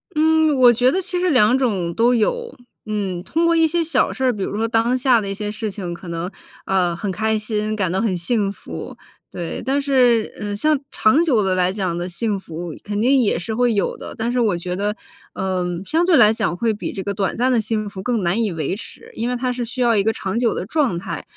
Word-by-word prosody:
嗯， 315 -1 +3
我 245 -1 +7
觉 250 +2 +3
得 375 - 0
其 360 -1 -1
实 365 0 +1
2 250 -4 +4
种 195 -10 -1
都 240 +6 +3
有。 470 - -1 0.4
嗯， 195 -4 -2
通 330 - 0
过 335 0 +3
一 325 -1 +4
些 335 +2 0
小 305 -5 +1
事 265 - -5
儿， 255 -1 +3
比 205 - -6
如 - - -3
说 225 +1 0
当 230 +2 +2
下 250 -3 +3
的 200 - -5
一 - - -2
些 210 +1 -4
事 215 +1 -3
情 190 -4 -5
可 175 +1 -10
能， 170 +2 -4 0.3
呃， 180 -3 +1
很 195 +3 -3
开 220 +3 0
心， 215 0 -2
感 190 -5 -1
到 190 - 0
很 205 -6 0
幸 200 +3 0
福， 85 - -9 0.3
对。 170 -2 -5
但 270 +2 +1
是， 250 -5 +2
嗯， 205 -1 -3
像 305 +9 +2 0.2
长 260 +5 +3
久 250 -11 +2
地 190 -1 +1
来 185 0 +2
讲 190 -4 -2
地 175 +1 -4
幸 205 +3 -2
福 170 -2 -7
肯 205 0 -3
定 260 +4 +4
也 220 - +1
是 185 +6 -4
会 240 0 +2
有 200 - 0
的， - - -9
但 230 +1 -1
是 250 - 0
我 210 -7 +2
觉 180 +1 -4
得， 205 +2 -1 0.4
嗯， 180 -2 -2
相 325 - +1
对 350 -3 +4
来 215 -3 +6
讲 210 -6 -1
会 225 +2 +1
比 210 - -5
这 190 - -5
个 200 - -2
短 195 -1 -2
暂 255 +2 +2
的 240 -3 +3
幸 215 -1 -2
福 195 -2 -7
更 230 0 -1
难 180 +6 +1
以 210 - -1
维 165 +3 -2
持， 220 - -11
因 235 +2 -2
为 250 - -1
它 250 0 -1
是 245 0 -3
需 240 +2 -5
要 235 -2 +3
一 205 - +3
个 220 - +2
长 200 0 -3
久 240 -2 +1
的 - - -3
状 265 - 0
态， 175 - -5
220 Hz, 265 characters per minute, -20 LUFS, 190-250 Hz, 0.4 s, 我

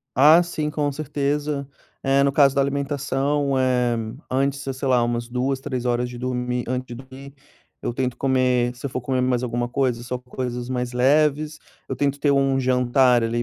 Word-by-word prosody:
Ah, 155 +6 +7
sim, 155 -3 -3
com 145 -1 -1
certeza. 145 0 -2 0.4
É, 135 0 +3
no 140 - +2
caso 140 -1 +4
da 140 - +2
alimentação, 140 0 0
eh, 125 -2 +2 0.3
antes, 135 +1 0
se 135 - -4
sei 130 +1 -4
lá, 125 -2 +4
umas 120 0 -2
2, 130 +2 -1
3 125 -2 -4
horas 120 0 0
de 120 -1 -9
dormir 125 -1 -2
antes 130 +1 -2
de 120 - -7
dormir 135 +2 -12 0.5
eu 120 - -3
tento 125 -2 -1
comer 125 -2 +1
se 125 - -15
eu 140 - -2
for 130 - -3
comer 130 +1 -1
mais 125 -1 +1
alguma 120 0 -1
coisa, 125 -2 -1
só 125 +1 -4
coisas 125 -1 -5
mais 125 -1 -2
leves. 150 +4 +2 0.3
Eu 135 - -3
tento 140 +1 0
ter 145 - +3
um 135 -1 +2
jantar, 125 -1 +3
ali, 120 +1 -1
130 Hz, 190 wpm, -23 LUFS, 125-140 Hz, 0.5 s, Ah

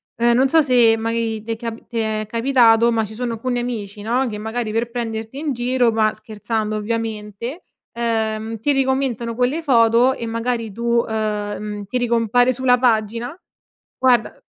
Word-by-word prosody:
ehm, 235 0 +3
non 265 - +4
so 320 +4 +4
se 245 -5 +4
mai 225 -1 -2
ti 230 - -3
è - - -4
cap 230 0 -7
ti 235 - -6
è 215 -1 -1
capitato 235 -1 +4
ma 225 -1 +1
ci 215 - -10
sono 240 0 -3
alcuni 245 +2 -2
amici 215 -4 -4
no 245 +4 0
che 210 -3 -5
magari 220 +1 -3
per 230 +2 -1
prenderti 225 +1 -4
in 300 -1 -2
giro 245 -1 +1
ma, 220 -1 +2
scherzando 215 0 -4
ovviamente, 220 - -4 0.3
uhm, 225 -1 -2
ti 290 +7 +1
ricommentano 265 -4 0
quelle 255 +7 0
foto 240 -2 +4
e 235 - -6
magari 230 0 -2
tu 235 +2 +1
uhm, 210 -1 -3
ti 250 - -2
ricompare 245 +1 +2
sulla 250 0 +3
pagina. 230 +1 0 0.6
Guarda 250 -3 +2
230 Hz, 165 wpm, -20 LUFS, 220-245 Hz, 0.6 s, non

